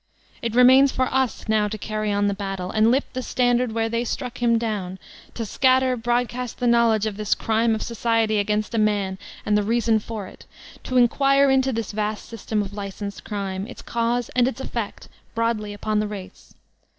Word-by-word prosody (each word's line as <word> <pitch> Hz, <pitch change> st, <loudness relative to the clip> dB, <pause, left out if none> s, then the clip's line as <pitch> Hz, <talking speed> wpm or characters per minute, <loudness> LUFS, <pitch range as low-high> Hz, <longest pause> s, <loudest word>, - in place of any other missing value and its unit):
It 230 Hz, -1 st, -3 dB
remains 260 Hz, +2 st, +7 dB
for 260 Hz, -, +1 dB
us 265 Hz, -4 st, 0 dB
now 215 Hz, -1 st, +2 dB
to 215 Hz, +1 st, -5 dB
carry 215 Hz, 0 st, -3 dB
on 205 Hz, 0 st, +1 dB
the 200 Hz, -, +1 dB
battle, 195 Hz, -2 st, -4 dB
and 220 Hz, +1 st, +3 dB
lift 265 Hz, +4 st, 0 dB
the 255 Hz, -, -3 dB
standard 245 Hz, -1 st, +1 dB
where 225 Hz, 0 st, 0 dB
they 230 Hz, +1 st, -1 dB
struck 245 Hz, +1 st, -4 dB
him 235 Hz, -1 st, +3 dB
down, 205 Hz, -5 st, -3 dB, 0.4 s
to 230 Hz, -, -3 dB
scatter 260 Hz, +3 st, +3 dB
broadcast 240 Hz, +1 st, -2 dB
the 250 Hz, -, -2 dB
knowledge 235 Hz, -3 st, +3 dB
of 210 Hz, -2 st, -3 dB
this 210 Hz, -1 st, +1 dB
crime 225 Hz, 0 st, +1 dB
of 220 Hz, -, -4 dB
society 225 Hz, -2 st, +1 dB
against 210 Hz, +2 st, -1 dB
a 225 Hz, -, +1 dB
man 200 Hz, -3 st, 0 dB, 0.3 s
and 210 Hz, -, +2 dB
the 210 Hz, -, +3 dB
reason 225 Hz, +1 st, +2 dB
for 215 Hz, -1 st, -6 dB
it; -, -, -14 dB, 0.4 s
to 255 Hz, -, 0 dB
inquire 275 Hz, +3 st, +4 dB
into 265 Hz, 0 st, +3 dB
this 225 Hz, -3 st, -3 dB
vast 210 Hz, 0 st, -3 dB
system 220 Hz, -2 st, -2 dB
of 200 Hz, 0 st, -8 dB
licensed 200 Hz, 0 st, -6 dB
crime, 195 Hz, -1 st, -4 dB
its 250 Hz, -, -10 dB
cause 235 Hz, 0 st, -1 dB
and 250 Hz, 0 st, +2 dB
its 260 Hz, -, -3 dB
effect, 235 Hz, -5 st, -5 dB, 0.3 s
broadly 230 Hz, -2 st, -1 dB
upon 210 Hz, +1 st, -1 dB
tiie 210 Hz, 0 st, -1 dB
race. 195 Hz, -3 st, -10 dB
225 Hz, 195 wpm, -23 LUFS, 210-245 Hz, 0.4 s, remains